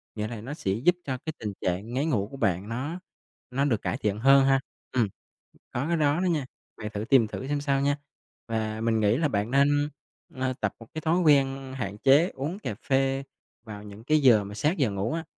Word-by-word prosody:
nghĩa 105 Hz, 0 st, -2 dB
là 115 Hz, -2 st, -6 dB
nó 135 Hz, +6 st, -6 dB
sẽ 95 Hz, -11 st, -2 dB
giúp 155 Hz, -, +3 dB
cho 130 Hz, -2 st, -2 dB
cái 160 Hz, -, -3 dB
tình 105 Hz, -2 st, -4 dB
trạng 95 Hz, +6 st, -2 dB
ngáy 140 Hz, +4 st, 0 dB
ngủ 105 Hz, -10 st, 0 dB
của 135 Hz, -, -8 dB
bạn 100 Hz, -2 st, 0 dB
nó 145 Hz, +10 st, -3 dB, 0.5 s
nó 140 Hz, +3 st, +1 dB
được 115 Hz, -7 st, +1 dB
cải -, -, -2 dB
thiện 105 Hz, 0 st, -1 dB
hơn 135 Hz, +2 st, +6 dB
ha. 135 Hz, 0 st, +4 dB, 0.3 s
Ừm, 120 Hz, -5 st, +2 dB, 0.7 s
có 130 Hz, +5 st, -1 dB
cái 170 Hz, -, +2 dB
đó 150 Hz, +2 st, +2 dB
đó 185 Hz, -, +1 dB
nha, 155 Hz, -7 st, 0 dB, 0.3 s
bạn 105 Hz, -1 st, -6 dB
thử 105 Hz, +1 st, -2 dB
tìm 125 Hz, -3 st, +5 dB
thử 130 Hz, +5 st, -6 dB
xem 145 Hz, -1 st, 0 dB
sao 140 Hz, -1 st, +1 dB
nha, 145 Hz, +1 st, +1 dB, 0.5 s
và 110 Hz, -1 st, -2 dB
mình 115 Hz, -1 st, +1 dB
nghĩ 105 Hz, +2 st, +3 dB
là 150 Hz, 0 st, +1 dB
bạn 105 Hz, -1 st, -1 dB
nên, 145 Hz, +2 st, +3 dB, 0.5 s
ờ, 130 Hz, 0 st, -1 dB
tập 105 Hz, -, 0 dB
một 115 Hz, -, -11 dB
cái 155 Hz, -, -3 dB
thói 165 Hz, +3 st, +2 dB
quen 135 Hz, -4 st, +3 dB
hạn 105 Hz, -5 st, -4 dB
chế 145 Hz, +9 st, +5 dB
uống 155 Hz, +9 st, -4 dB
cà 110 Hz, -, -4 dB
phê 135 Hz, +3 st, 0 dB, 0.4 s
vào 105 Hz, -3 st, -8 dB
những 105 Hz, +2 st, -11 dB
cái 155 Hz, +2 st, +3 dB
giờ 115 Hz, -7 st, +6 dB
mà 100 Hz, +1 st, -8 dB
sát 150 Hz, -, 0 dB
giờ 130 Hz, -8 st, +2 dB
ngủ 100 Hz, +7 st, -2 dB
á, 165 Hz, 0 st, -2 dB
130 Hz, 230 wpm, -27 LUFS, 110-145 Hz, 0.7 s, hơn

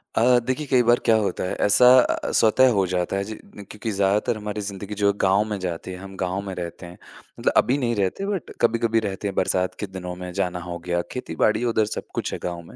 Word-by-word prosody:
अ, 125 Hz, +2 st, +5 dB
देखिए, 130 Hz, +5 st, -2 dB
कई 130 Hz, -2 st, +4 dB
बार 120 Hz, +1 st, +4 dB
क्या 115 Hz, -, +5 dB
होता 105 Hz, -3 st, -1 dB
है, 90 Hz, -, -2 dB
ऐसा 125 Hz, +5 st, +5 dB
अ -, -, +2 dB
अ, -, -, -2 dB
स्वतः 120 Hz, +4 st, +4 dB
हो 95 Hz, -, +3 dB
जाता 90 Hz, +1 st, -1 dB
है 100 Hz, -, -1 dB
जी, 110 Hz, +2 st, -6 dB, 0.2 s
न 105 Hz, -, -9 dB
क्योंकि 110 Hz, +1 st, -5 dB
ज़्यादातर 105 Hz, +4 st, +1 dB
हमारी 105 Hz, 0 st, -5 dB
ज़िंदगी 100 Hz, 0 st, -6 dB
जो 100 Hz, 0 st, +4 dB
गाँव 95 Hz, +2 st, +4 dB
में 105 Hz, -, -2 dB
जाती 90 Hz, 0 st, -5 dB
है, 90 Hz, -, -7 dB
हम 95 Hz, +1 st, -10 dB
गाँव 95 Hz, +1 st, -2 dB
में 95 Hz, -, -4 dB
रहते 90 Hz, 0 st, -6 dB
हैं। 85 Hz, +1 st, -11 dB, 0.4 s
मतलब -, -, +1 dB
अभी 130 Hz, +3 st, +3 dB
नहीं 120 Hz, -4 st, 0 dB
रहते, 100 Hz, -, -1 dB
बट 200 Hz, -4 st, -3 dB
कभी-कभी 115 Hz, -1 st, +2 dB
रहते 95 Hz, +1 st, -4 dB
हैं, 100 Hz, -, -4 dB
बरसात 90 Hz, 0 st, 0 dB
के 105 Hz, -, -3 dB
दिनों 90 Hz, -1 st, -7 dB
में 90 Hz, 0 st, -7 dB
जाना 90 Hz, -1 st, -2 dB
हो 85 Hz, -, -4 dB
गया, 85 Hz, 0 st, +1 dB
खेती-बाड़ी 110 Hz, -2 st, 0 dB
है, -, -, 0 dB
उधर 110 Hz, -2 st, +2 dB
सब -, -, -6 dB
कुछ -, -, -2 dB
है -, -, -4 dB
गाँव 85 Hz, -1 st, -4 dB
में। 85 Hz, -, -15 dB
100 Hz, 250 wpm, -23 LUFS, 90-115 Hz, 0.4 s, अ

